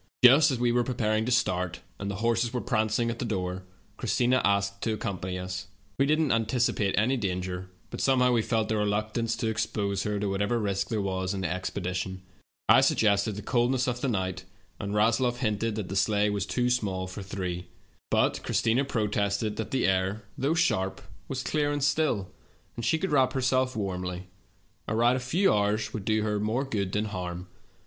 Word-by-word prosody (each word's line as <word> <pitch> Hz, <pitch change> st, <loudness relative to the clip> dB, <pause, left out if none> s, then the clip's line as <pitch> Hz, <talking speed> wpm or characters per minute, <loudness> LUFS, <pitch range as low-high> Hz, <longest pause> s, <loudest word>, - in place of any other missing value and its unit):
"Just 140 Hz, +5 st, +8 dB
as 130 Hz, -, 0 dB
we 120 Hz, 0 st, +2 dB
were 120 Hz, 0 st, +2 dB
preparing 110 Hz, -3 st, 0 dB
to 125 Hz, -, -1 dB
start, 90 Hz, -7 st, 0 dB, 0.2 s
and 100 Hz, -, -3 dB
the 100 Hz, -, -3 dB
horses 115 Hz, 0 st, +2 dB
were 125 Hz, -, -1 dB
prancing 115 Hz, -1 st, 0 dB
at 115 Hz, -, -7 dB
the -, -, -1 dB
door, 95 Hz, -5 st, -2 dB, 0.4 s
Christina 125 Hz, +1 st, +2 dB
asked 100 Hz, 0 st, +1 dB
to 110 Hz, -, 0 dB
accompany 95 Hz, -4 st, -4 dB
us. 90 Hz, 0 st, -5 dB, 0.3 s
We 135 Hz, -, +4 dB
did 155 Hz, +2 st, +3 dB
not 135 Hz, -8 st, +2 dB
antici 120 Hz, +2 st, +1 dB
pate 100 Hz, -3 st, 0 dB
any 125 Hz, +6 st, +2 dB
danger, 90 Hz, -3 st, -3 dB, 0.2 s
but -, -, -5 dB
somehow 125 Hz, -2 st, +4 dB
we 120 Hz, -2 st, +3 dB
felt 110 Hz, -1 st, 0 dB
a -, -, +3 dB
reluc 105 Hz, 0 st, 0 dB
tance 115 Hz, -1 st, 0 dB
to 115 Hz, 0 st, -2 dB
expose 105 Hz, -3 st, -1 dB
her 105 Hz, 0 st, -1 dB
to 105 Hz, -, -1 dB
whatever 100 Hz, +4 st, 0 dB
risk 100 Hz, -3 st, -1 dB
there 110 Hz, -3 st, -1 dB
was 95 Hz, 0 st, -2 dB
in 95 Hz, -, -3 dB
the 90 Hz, -, -1 dB
expedition. 95 Hz, 0 st, -4 dB, 0.4 s
I -, -, +7 dB
suggested 100 Hz, -1 st, +2 dB
the 105 Hz, -, -6 dB
coldness 125 Hz, +1 st, +1 dB
of 120 Hz, -1 st, -2 dB
the -, -, 0 dB
night, 95 Hz, -5 st, -2 dB, 0.4 s
and 100 Hz, 0 st, -3 dB
Rasloff 115 Hz, +3 st, +2 dB
hinted 115 Hz, -2 st, -1 dB
that 105 Hz, -4 st, -3 dB
the 95 Hz, -, -5 dB
sleigh 105 Hz, +1 st, +2 dB
was 100 Hz, -1 st, -2 dB
too 125 Hz, +6 st, +1 dB
small 100 Hz, -6 st, -1 dB
for 95 Hz, +3 st, -7 dB
three. 90 Hz, -2 st, -4 dB, 0.4 s
But -, -, +2 dB
Christina 120 Hz, +4 st, +1 dB
protested 105 Hz, -3 st, -1 dB
that 110 Hz, -3 st, -3 dB
the 130 Hz, -, +1 dB
air, 95 Hz, +3 st, +1 dB
though 140 Hz, +5 st, 0 dB
sharp, 95 Hz, -, +1 dB, 0.3 s
was 130 Hz, -2 st, -3 dB
clear 145 Hz, -1 st, 0 dB
and 145 Hz, -1 st, -1 dB
still, 145 Hz, -10 st, +1 dB, 0.4 s
and 115 Hz, -, -5 dB
she 160 Hz, -, +2 dB
could 190 Hz, +1 st, -2 dB
wrap 135 Hz, -3 st, +3 dB
herself 130 Hz, -1 st, +1 dB
warmly; 90 Hz, -3 st, -3 dB, 0.6 s
a 110 Hz, -, -1 dB
ride 120 Hz, +2 st, +4 dB
of -, -, -4 dB
a -, -, -8 dB
few 180 Hz, +9 st, +3 dB
hours 105 Hz, +1 st, 0 dB
would 105 Hz, -3 st, -5 dB
do 110 Hz, -1 st, +2 dB
her 105 Hz, -1 st, 0 dB
more 110 Hz, +6 st, 0 dB
good 100 Hz, -8 st, -2 dB
than 105 Hz, +2 st, 0 dB
harm. 90 Hz, -3 st, -5 dB
110 Hz, 200 wpm, -28 LUFS, 95-120 Hz, 0.6 s, Just